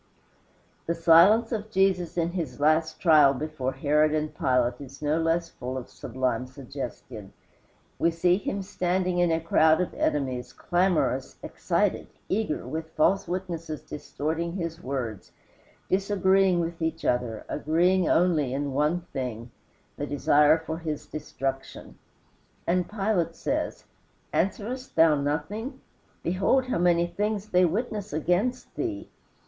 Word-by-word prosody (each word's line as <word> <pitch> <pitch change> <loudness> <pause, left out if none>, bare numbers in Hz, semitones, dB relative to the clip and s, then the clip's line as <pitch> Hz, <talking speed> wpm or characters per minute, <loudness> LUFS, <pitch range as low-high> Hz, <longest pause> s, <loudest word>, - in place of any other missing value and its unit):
The 170 - 0
silence 175 +8 +6
of 215 -2 -3
Jesus 190 -4 +1
in 170 0 +1
his 170 -5 -4
last 155 +2 +2
trial 150 -5 +6
before 140 -2 -3
Herod 150 +3 +2
and 155 0 -2
Pilate 125 0 +1
is 135 0 -10
no 150 +2 0
less 165 +1 0
full 130 +1 -5
of 125 - -8
sublime 125 -1 -2
suggestion. 130 -5 -8 0.7
We 170 - +3
see 175 +2 +2
him 200 0 -3
standing 185 -1 -1
in 175 -1 +3
a 160 - +2
crowd 160 0 +4
of 180 - -1
enemies 130 -4 -1
clamorous, 155 -8 0
excited, - - -1 0.2
eager, 205 -6 -1
with 160 0 -5
false 190 +5 +2
witnesses 170 -3 -4
distorting 160 +3 -4
his 170 -2 -4
words, 125 -6 -5 0.5
disagreeing 190 -1 +2
with 165 0 -4
each 160 0 -2
other, 120 -3 -1
agreeing 175 +4 +2
only 155 -7 +2
in 140 -1 -2
one 150 +5 +1
thing: 120 -3 -4 0.5
the 145 - -3
desire 150 +2 +4
for 160 0 -5
his 155 -3 -4
destruction. 135 -3 -5 0.7
And 180 +1 0
Pilate 195 -6 0
says, - - -2 0.5
"Answerest 240 +7 -2
thou 165 -1 +6
nothing? 150 - -3 0.4
Behold 195 +9 +2
how 255 -8 -1
many 175 -1 +3
things 210 +3 -2
they 180 -1 +4
witness 210 +3 -2
against 180 - -1
thee." 330 -4 -4
165 Hz, 130 wpm, -26 LUFS, 145-185 Hz, 0.7 s, silence